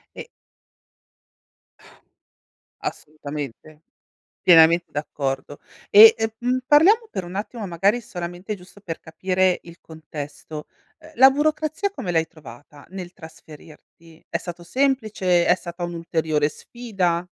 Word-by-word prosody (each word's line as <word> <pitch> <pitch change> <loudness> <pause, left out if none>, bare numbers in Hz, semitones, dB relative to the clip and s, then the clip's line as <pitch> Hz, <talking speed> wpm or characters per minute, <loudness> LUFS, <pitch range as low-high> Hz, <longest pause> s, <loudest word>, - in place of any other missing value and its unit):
E - - -8 2.5
Assolutamente. 150 0 -7 0.6
Pienamente 170 0 +6
d'accordo. 140 -1 -4 0.3
E, 220 +2 +10
ehm, 225 0 -1
mhmm, 250 +1 0
parliamo 405 +10 +5
per 185 - -4
un 180 - -9
attimo 215 +2 -5
magari, 195 +7 +1
solamente, 180 +2 -6
giusto 180 +2 -16
per 165 -5 -6
capire 185 +2 0
il 170 0 -14
contesto, 150 -1 -9 0.3
uhm, 315 0 -15
la 265 +1 +8
burocrazia 310 +6 -1
come 190 - -5
l'hai 165 -1 +2
trovata, 145 -2 -15
nel 185 -2 -8
trasferirti? 160 0 -16
È - - -2
stato 175 -1 -8
semplice? 215 -7 +1
È - - +5
stata 175 -1 -8
un'ulteriore 160 -3 -1
sfida? 185 -6 -3
175 Hz, 115 wpm, -22 LUFS, 160-215 Hz, 2.5 s, E